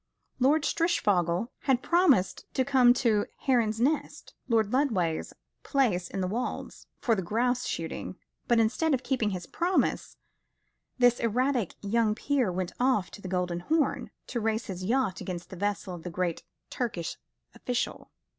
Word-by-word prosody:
Lord 285 Hz, +4 st, +4 dB
Strishfogel 205 Hz, -, +1 dB, 0.2 s
had 260 Hz, -2 st, +2 dB
promised 340 Hz, -, +2 dB
to 260 Hz, -, +2 dB
come 255 Hz, -3 st, +5 dB
to 225 Hz, -5 st, +2 dB
Heron's 230 Hz, -5 st, +2 dB
Nest, 290 Hz, +6 st, -1 dB
Lord 225 Hz, -3 st, +2 dB
Lodway's 195 Hz, -, +1 dB, 0.3 s
place 210 Hz, -, +1 dB
in 195 Hz, -, -3 dB
the 185 Hz, -, 0 dB
Wolds, 235 Hz, +6 st, -4 dB
for 235 Hz, -, +1 dB
the 200 Hz, -, 0 dB
grouse 245 Hz, +6 st, 0 dB
shooting; 165 Hz, +3 st, -4 dB, 0.3 s
but 235 Hz, -1 st, +4 dB
instead 270 Hz, +7 st, +2 dB
of 255 Hz, -, -5 dB
keeping 245 Hz, -6 st, 0 dB
his 185 Hz, -3 st, -4 dB
promise, 355 Hz, +2 st, 0 dB, 0.8 s
this 245 Hz, -1 st, +4 dB
erratic 245 Hz, -1 st, 0 dB
young 215 Hz, +1 st, +2 dB
peer 255 Hz, -4 st, 0 dB
went 180 Hz, 0 st, -3 dB
off 250 Hz, -7 st, +2 dB
to 205 Hz, -, -11 dB
the 190 Hz, -, -6 dB
Golden 180 Hz, -1 st, -1 dB
Horn, 305 Hz, -, 0 dB, 0.2 s
to 240 Hz, -, -3 dB
race 220 Hz, 0 st, -1 dB
his 185 Hz, -1 st, -6 dB
yacht 230 Hz, -2 st, 0 dB
against 175 Hz, -2 st, -6 dB
the -, -, -6 dB
vessel 200 Hz, 0 st, -2 dB
of 170 Hz, -2 st, -8 dB
a 180 Hz, -, -4 dB
great 175 Hz, -1 st, -2 dB, 0.3 s
Turkish 175 Hz, -10 st, -3 dB, 0.4 s
official. 245 Hz, -1 st, -3 dB
225 Hz, 155 wpm, -28 LUFS, 185-260 Hz, 0.8 s, come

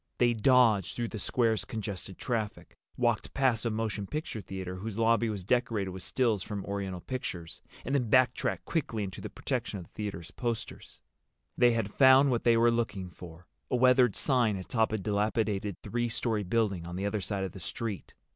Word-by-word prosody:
They 120 Hz, -1 st, +4 dB
dodged 115 Hz, -4 st, +4 dB
through 120 Hz, -1 st, -2 dB
the 110 Hz, -, -6 dB
square's 115 Hz, +1 st, +1 dB
congested 100 Hz, -4 st, -6 dB
traffic, 110 Hz, -4 st, -3 dB, 0.2 s
walked 120 Hz, -2 st, 0 dB
past 130 Hz, -4 st, +2 dB
a -, -, +2 dB
motion 110 Hz, -2 st, -2 dB
picture 150 Hz, -, -4 dB
theater 95 Hz, -2 st, -6 dB
whose 105 Hz, +2 st, -5 dB
lobby 115 Hz, 0 st, +3 dB
was 100 Hz, -4 st, -4 dB
decorated 115 Hz, -3 st, 0 dB
with 95 Hz, 0 st, -7 dB
stills 115 Hz, -2 st, +1 dB
from 100 Hz, 0 st, -5 dB
Oriental 100 Hz, -3 st, -4 dB
pictures, 90 Hz, -10 st, -5 dB, 0.2 s
and 135 Hz, -, -2 dB
then 125 Hz, -5 st, +1 dB
backtracked 130 Hz, +1 st, +2 dB
quickly 120 Hz, -10 st, -1 dB
into 95 Hz, -2 st, -6 dB
the -, -, -6 dB
protection -, -, -3 dB
of 90 Hz, -, -8 dB
the -, -, -26 dB
theater's 100 Hz, -6 st, -5 dB
posters. 120 Hz, -3 st, -5 dB, 0.5 s
They 120 Hz, -1 st, +5 dB
had 110 Hz, -3 st, -2 dB
found 135 Hz, 0 st, +6 dB
what 120 Hz, -, -1 dB
they 115 Hz, -1 st, +5 dB
were 120 Hz, +1 st, +5 dB
looking 105 Hz, -6 st, -2 dB
for—a 90 Hz, +8 st, -8 dB
weathered 125 Hz, -2 st, +5 dB
sign 120 Hz, -7 st, +2 dB
atop 110 Hz, +4 st, 0 dB
a 110 Hz, -, 0 dB
dilapidated 105 Hz, -1 st, -1 dB
three 120 Hz, 0 st, -1 dB
story 110 Hz, -1 st, -1 dB
building 100 Hz, -4 st, 0 dB
on 90 Hz, -, -6 dB
the 95 Hz, +2 st, -2 dB
other 100 Hz, 0 st, -1 dB
side 100 Hz, 0 st, -2 dB
of 95 Hz, -, -3 dB
the 95 Hz, -, -10 dB
street. 105 Hz, +3 st, -5 dB
110 Hz, 185 wpm, -30 LUFS, 100-120 Hz, 0.5 s, found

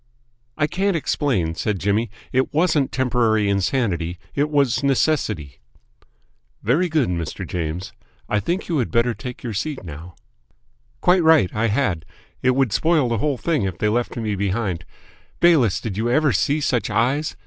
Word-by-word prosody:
"I 150 Hz, -, +2 dB
can't 190 Hz, +5 st, 0 dB
explain," 125 Hz, -, 0 dB
said 105 Hz, +4 st, -2 dB
Jimmy. 105 Hz, +4 st, 0 dB, 0.2 s
"It 130 Hz, +1 st, +1 dB
wasn't 160 Hz, -4 st, +2 dB
temporary 115 Hz, -5 st, +1 dB
insanity; 100 Hz, -4 st, 0 dB, 0.2 s
it 145 Hz, +1 st, 0 dB
was 140 Hz, -5 st, +2 dB
necessity." 110 Hz, -, 0 dB, 1.0 s
"Very 160 Hz, -, +2 dB
good, 155 Hz, -5 st, +2 dB
Mr. 85 Hz, -3 st, -3 dB
James. 85 Hz, +1 st, -4 dB, 0.3 s
I 105 Hz, -, +1 dB
think 175 Hz, -, -2 dB
you 165 Hz, -4 st, 0 dB
had 120 Hz, -, -1 dB
better 115 Hz, +1 st, +2 dB
be 105 Hz, -, -17 dB
taking 125 Hz, 0 st, -6 dB
your -, -, -4 dB
seat 140 Hz, +5 st, -3 dB
now." 80 Hz, +1 st, -9 dB, 0.9 s
"Quite 180 Hz, 0 st, +4 dB
right, 160 Hz, -, +5 dB
I 115 Hz, +2 st, +1 dB
had. 100 Hz, -, 0 dB, 0.4 s
It 130 Hz, 0 st, +2 dB
would 130 Hz, -6 st, +1 dB
spoil 160 Hz, -6 st, +2 dB
the 115 Hz, -2 st, 0 dB
whole 145 Hz, +2 st, 0 dB
thing 155 Hz, 0 st, 0 dB
if 95 Hz, -3 st, -2 dB
they 105 Hz, -, +1 dB
left 120 Hz, +3 st, -1 dB
me 110 Hz, -3 st, -2 dB
behind. 95 Hz, -3 st, -2 dB, 0.5 s
Bayliss, 150 Hz, -, +4 dB
did 100 Hz, -4 st, -5 dB
you 115 Hz, +2 st, 0 dB
ever 150 Hz, +3 st, +3 dB
see 145 Hz, +10 st, +1 dB
such 125 Hz, -5 st, 0 dB
eyes? 125 Hz, +8 st, 0 dB
120 Hz, 165 wpm, -22 LUFS, 100-145 Hz, 1.0 s, right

